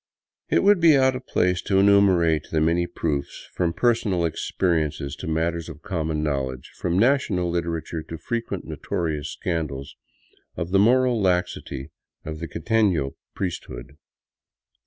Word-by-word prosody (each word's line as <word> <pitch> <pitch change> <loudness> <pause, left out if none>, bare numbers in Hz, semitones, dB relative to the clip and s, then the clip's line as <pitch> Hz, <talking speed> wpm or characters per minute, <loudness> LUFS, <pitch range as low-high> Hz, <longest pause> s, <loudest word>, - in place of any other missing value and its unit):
It - - +3
would 205 -1 +5
be 165 -4 +6
out 130 -1 +3
of 130 0 -8
place 90 -1 +1
to 95 - 0
enumerate 95 -6 +4
the 80 - 0
many 85 +2 +2
proofs, 75 -5 -3
from 85 -2 0
per 120 +8 +3
i - - +3
sonal 95 -7 0
experiences 80 -4 -1
to - - -7
matters 85 +1 -1
of 75 -1 -11
common 80 -4 -2
knowledge, 65 -4 -3
from 90 0 0
national 100 -7 +2
literature 85 -1 -3
to 80 - -5
frequent 115 +7 -4
notorious 75 -3 -3
scandals, 75 -7 -4 0.6
of 85 +2 -3
the 95 - +4
moral 125 +2 +4
laxity 90 -7 -1 0.3
of 80 0 -5
the 85 - -5
quiteno 85 -8 +1 0.2
priesthood. 70 -7 -5
85 Hz, 145 wpm, -24 LUFS, 80-100 Hz, 0.6 s, be